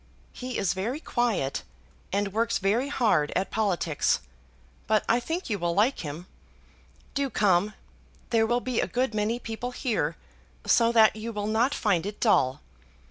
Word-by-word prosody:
He 255 -1 -5
is 190 - +1
very 225 +10 -3
quiet, 235 - -1 0.5
and 200 0 -1
works 230 +1 +1
very 215 +8 +1
hard 210 - +2
at 190 - -1
politics; 180 -8 +1 0.7
but 215 -1 +2
I 235 - +3
think 330 +9 -4
you 205 -4 -2
will 170 0 -1
like 225 +7 +2
him. 155 +3 -6 0.9
Do 280 -1 0
come! 205 -2 +2 0.6
There 225 -1 +3
will 240 +1 +1
be 255 -2 -1
a - - -1
good 250 -1 -1
many 215 +2 0
people 230 +1 -5
here, 220 - -1 0.5
so 230 -1 +4
that 220 -2 +5
you 220 +2 -5
will 210 -2 -3
not 230 +6 +1
find 195 -4 +1
it 205 - -6
dull. 140 - +2
220 Hz, 160 wpm, -27 LUFS, 195-240 Hz, 0.9 s, that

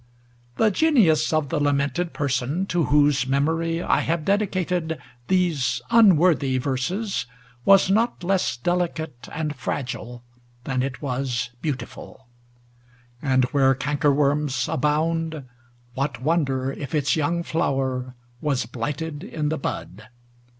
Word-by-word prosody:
The 220 -1 +4
genius 200 - +3
of 155 -3 0
the 160 - 0
lamented 145 +4 0
person 140 +5 -1
to 175 -4 0
whose 145 -3 +3
memory 165 +5 0
I - - +2
have 165 -2 -1
dedicated 180 -5 0 0.3
these 155 -10 +1
unworthy 175 - +5
verses 140 - -2 0.4
was 195 -1 +6
not 225 -1 +1
less 185 -6 0
delicate 165 -3 -2
and 155 -2 -3
fragile 125 -2 -5 0.4
than 130 0 -1
it 135 +2 -4
was 125 -2 -2
beautiful; 130 -2 -6 1.0
and 130 -2 +2
where 135 -2 +4
cankerworms 145 -1 +1
abound 160 +2 0 0.5
what 135 -1 -2
wonder 135 -3 0
if 140 +2 -5
its 145 -1 +2
young 165 +2 0
flower 130 -5 -1 0.3
was 140 -6 0
blighted 145 +6 -4
in 155 -7 -3
the 160 - -1
bud 105 -5 -5
150 Hz, 115 wpm, -24 LUFS, 130-165 Hz, 1.0 s, was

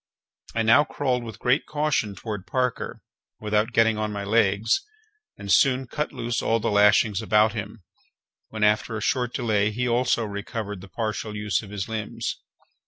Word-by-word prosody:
I 115 - +1
now 115 +6 +6
crawled 130 -5 -1
with 115 -2 -8
great 125 +5 +1
caution 145 -9 0
toward 105 -1 -6
Parker, 125 -2 -2 0.4
without 105 +2 0
getting 115 -2 +3
on 105 0 -1
my 100 -1 -4
legs, 105 - +2 0.6
and 100 -1 -5
soon 130 +2 +4
cut 150 +5 -3
loose 120 0 -2
all 115 0 +1
the 115 - -1
lashings 105 0 +4
about 110 0 +3
him, 105 -1 -6 0.6
when, 110 -1 -4
after 105 +1 +2
a - - -5
short 125 +1 0
delay, 110 -5 +1
he 125 +3 -2
also 120 -1 +1
recovered 105 -1 -5
the 100 - -12
partial 110 -1 -3
use 105 -3 -1
of 105 - -11
his 100 -2 -4
limbs. 110 -1 -4
110 Hz, 170 wpm, -25 LUFS, 105-120 Hz, 0.6 s, now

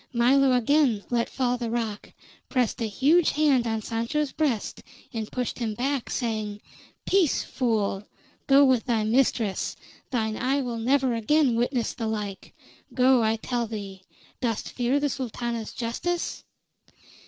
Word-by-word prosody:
Milo 260 +3 +4
again 250 -3 +3
let 235 -1 +1
fall 250 -2 -1
the 235 -2 -3
rock, 225 -3 -3 0.4
pressed 250 -3 0
a 225 - 0
huge 295 - +3
hand 280 -6 +3
on 220 -1 -2
Sancho's 235 +7 -1
breast, 270 -9 -1 0.3
and 220 -2 -4
pushed 250 -1 -3
him 220 -3 -2
back, 265 +2 -2
saying: 215 -4 -2 0.5
"Peace, 370 -6 +2
fool! 215 -5 -1 0.4
Go 275 +1 +7
with 255 -4 +3
thy 230 -4 +1
mistress. 225 -3 +1 0.3
Thine 220 -4 -1
eye 265 +3 +1
will 235 -2 -4
never 260 +2 +2
again 250 +3 +2
witness 240 0 0
the 230 -3 -4
like. 210 -3 -5 0.4
Go, 255 -1 +5
I 220 0 +2
tell 235 +1 -2
thee. 200 -4 -7 0.4
Dost 230 -4 -2
fear 250 +3 +1
the 290 - +1
Sultana's 235 -4 -4
justice?" 335 +9 -3
240 Hz, 140 wpm, -26 LUFS, 225-265 Hz, 0.5 s, Go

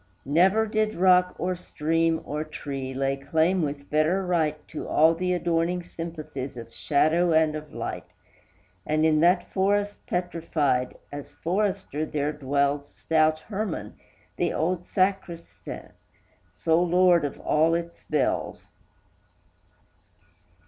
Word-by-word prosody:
Never 185 +10 +4
did 215 0 0
rock 180 0 +4
or 180 +1 -1
stream 165 -1 0
or 150 +1 -3
tree 140 -3 -6
lay 135 +1 -1
claim 160 +6 +1
with 140 -2 -4
better 160 +6 +2
right 160 -4 +1
To 155 - -6
all 160 +2 +5
the 180 +2 -1
adorning 175 0 0
sympathies 155 -6 -7
of 115 -1 -9
shadow 160 +4 +2
and 160 -1 +3
of 155 -1 -7
light; - - -5 0.8
And, 155 +4 +1
in 155 -1 +4
that 175 +3 +3
forest 205 +1 +1
petrified, 160 -7 -1
as 145 -1 -8
forester 185 -4 -1
there 150 -1 -2
dwells 140 0 0
Stout 155 -1 +1
Herman, 195 - -4 0.4
the - - +1
old 175 +2 -1
sacristan, 185 -3 -2 0.6
sole 165 - +1
lord 180 -1 +4
of 145 - -4
all 160 +2 +2
its 170 0 -5
bells. 150 -3 -1
165 Hz, 120 wpm, -26 LUFS, 150-180 Hz, 0.8 s, all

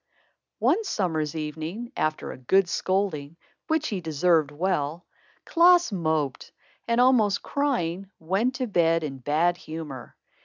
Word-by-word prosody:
One 450 - +2
summer's 165 - -1
evening, 160 - -5
after 155 0 -2
a - - -9
good 190 +9 +3
scolding, 170 -5 -1 0.3
which 315 -1 0
he 195 -4 -3
deserved 160 -1 +2
well, 160 0 -2 0.4
Klaas 350 -3 +5
moped 155 -7 -2 0.4
and, 235 +1 +1
almost 240 -6 +4
crying, 195 - -1
went 195 +10 0
to 255 0 -2
bed 165 -6 +2
in 135 -3 -5
bad 160 +6 +1
humor. 155 -7 -8
175 Hz, 125 wpm, -26 LUFS, 155-215 Hz, 0.4 s, Klaas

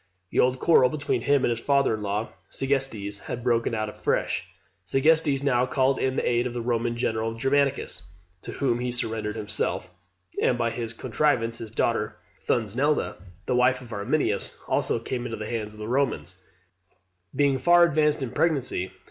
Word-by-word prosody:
The - - 0
old 130 +1 +3
quarrel 130 -3 +5
between 150 0 -1
him 140 -2 +2
and - - +2
his 115 - -1
father 140 -1 +2
in 110 - -3
law, 105 +2 -2 0.2
Segestes, 130 -7 0
had 120 - -6
broken 115 -2 +1
out 110 0 -1
afresh. 105 - -1 0.4
Segestes 140 - +2
now 125 -2 +2
called 130 0 +2
in 130 0 0
the - - 0
aid 120 +1 +2
of 120 - -7
the 120 - -2
Roman 120 0 -1
general, 115 -1 -1
Germanicus, 135 - 0 0.3
to - - -7
whom 125 -4 0
he 125 0 -2
surrendered 110 -3 -2
himself; 105 -4 -3 0.5
and 120 - +2
by 115 -1 0
his 115 -1 -4
contrivance 115 -1 0
his 115 - -7
daughter - - 0 0.3
Thusnelda, 125 +7 0 0.3
the - - 0
wife 125 +1 +3
of 120 -3 -10
Arminius, 100 -1 0
also - - +1
came 120 +2 -4
into 115 -2 -4
the 105 0 -5
hands 110 -2 -3
of 105 - -15
the 105 0 -6
Romans, 125 -8 -1 1.0
being 140 -2 +2
far 175 +6 +6
advanced 150 -3 +2
in 120 - -4
pregnancy. 130 - 0
120 Hz, 175 wpm, -26 LUFS, 115-135 Hz, 1.0 s, far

